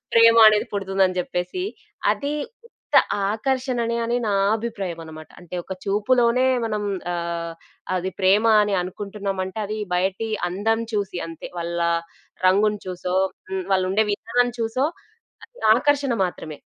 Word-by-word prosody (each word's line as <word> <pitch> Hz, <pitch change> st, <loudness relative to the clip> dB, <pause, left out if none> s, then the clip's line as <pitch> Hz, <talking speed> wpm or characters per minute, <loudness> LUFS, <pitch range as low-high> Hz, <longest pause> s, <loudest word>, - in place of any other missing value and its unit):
ప్రేమ 230 Hz, 0 st, +7 dB
అనేది 215 Hz, -1 st, +2 dB
పుడుతుందని 195 Hz, -2 st, +1 dB
చెప్పేసి. 180 Hz, -, -3 dB, 0.5 s
అది 285 Hz, +1 st, -1 dB, 0.3 s
ఉత్త -, -, -16 dB, 0.4 s
ఆకర్షణ 255 Hz, +2 st, -1 dB
అనె 235 Hz, 0 st, -1 dB
అని 235 Hz, +1 st, 0 dB
నా 205 Hz, -, +1 dB, 0.2 s
అభిప్రాయం 200 Hz, -7 st, -4 dB
అన్నమాట. 155 Hz, 0 st, -10 dB
అంటే 175 Hz, 0 st, -10 dB
ఒక -, -, -6 dB
చూపులోనే 235 Hz, +5 st, +2 dB, 0.2 s
మనం 215 Hz, -2 st, -2 dB, 0.3 s
ఆహ్, 170 Hz, -1 st, -3 dB, 0.4 s
అది 185 Hz, +1 st, -2 dB
ప్రేమ 195 Hz, +4 st, +4 dB, 0.2 s
అని 205 Hz, -1 st, 0 dB
అనుకుంటున్నాం 195 Hz, +1 st, -5 dB
అంటే 190 Hz, +4 st, -7 dB
అది 215 Hz, +1 st, -4 dB, 0.2 s
బయటి 190 Hz, +5 st, 0 dB, 0.2 s
అందం 220 Hz, +5 st, 0 dB
చూసి 195 Hz, -3 st, -2 dB
అంతే. 165 Hz, -, -8 dB
వాళ్ళ 170 Hz, 0 st, -3 dB, 0.7 s
రంగుని 205 Hz, +2 st, +3 dB
చూసో 180 Hz, 0 st, -3 dB, 0.4 s
హ్మ్. 190 Hz, -1 st, -2 dB
వాళ్ళుండే 190 Hz, +3 st, +2 dB
విధానం 245 Hz, +4 st, +1 dB
చూసో 230 Hz, +5 st, +1 dB, 0.6 s
అది -, -, -21 dB, 0.2 s
ఆకర్షణ 280 Hz, 0 st, +2 dB
మాత్రమే. 160 Hz, -4 st, -6 dB
205 Hz, 135 wpm, -23 LUFS, 185-230 Hz, 0.7 s, ప్రేమ